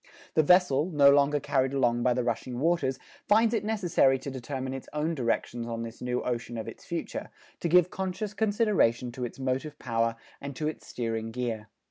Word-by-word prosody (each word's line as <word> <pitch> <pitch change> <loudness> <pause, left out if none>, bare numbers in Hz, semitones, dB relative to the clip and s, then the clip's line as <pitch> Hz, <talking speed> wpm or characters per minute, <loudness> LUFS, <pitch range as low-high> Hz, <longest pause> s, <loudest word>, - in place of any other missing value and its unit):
The 155 - +5
vessel, 165 -2 +4
no 145 -4 +6
longer 145 +1 +4
carried 135 -1 0
along 120 -3 +2
by 125 0 +2
the 125 - 0
rushing 120 +1 -2
waters, 145 -4 +1 0.3
finds 220 +2 +4
it 225 - 0
necessary 180 -11 +2
to 140 - -6
determine 130 0 -4
its 135 - -7
own 150 +2 0
directions 120 -3 -1
on 115 -1 -3
this 115 0 -8
new 125 0 -1
ocean 120 -1 -3
of 110 - -5
its - - -9
future, - - -4 0.3
to 170 - -1
give 180 +1 +5
conscious 190 +2 -3
consideration 205 - +2
to 125 +1 -4
its 120 - -8
motive 135 +3 -2
power 115 -1 0 0.3
and 140 -1 -6
to 150 +3 -2
its 155 - -5
steering 115 -2 -3
gear. 115 -2 -3
135 Hz, 190 wpm, -28 LUFS, 120-165 Hz, 0.3 s, no